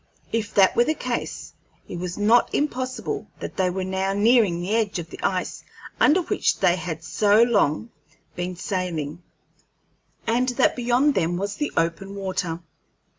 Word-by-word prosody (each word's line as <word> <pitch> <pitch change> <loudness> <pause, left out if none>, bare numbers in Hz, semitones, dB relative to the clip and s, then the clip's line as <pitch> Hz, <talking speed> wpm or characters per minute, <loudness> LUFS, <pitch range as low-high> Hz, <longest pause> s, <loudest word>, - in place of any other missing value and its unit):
If 225 -2 -1
that 195 -2 +5
were 240 - +5
the 310 - 0
case, 250 -4 -4 0.3
it 175 - -6
was 180 0 -4
not 225 +3 +4
impossible 255 -3 -2
that - - -6
they 185 -2 +2
were 185 +1 -3
now 190 +1 -1
nearing 210 -4 +3
the 185 +5 -1
edge 215 -4 0
of 170 -1 -6
the - - -9
ice 185 -1 -2 0.4
under 345 +5 +5
which - - 0
they 175 - +4
had 165 -3 -5
so 210 +5 +4
long 225 -2 +1 0.4
been 180 0 -3
sailing, 175 -4 -3 1.0
and 245 +3 +1
that - - +3
beyond 250 +4 +2
them 175 -3 0
was 200 +2 -3
the 295 - -2
open 170 +4 -1
water. 185 -4 -3
195 Hz, 160 wpm, -24 LUFS, 175-235 Hz, 1.0 s, that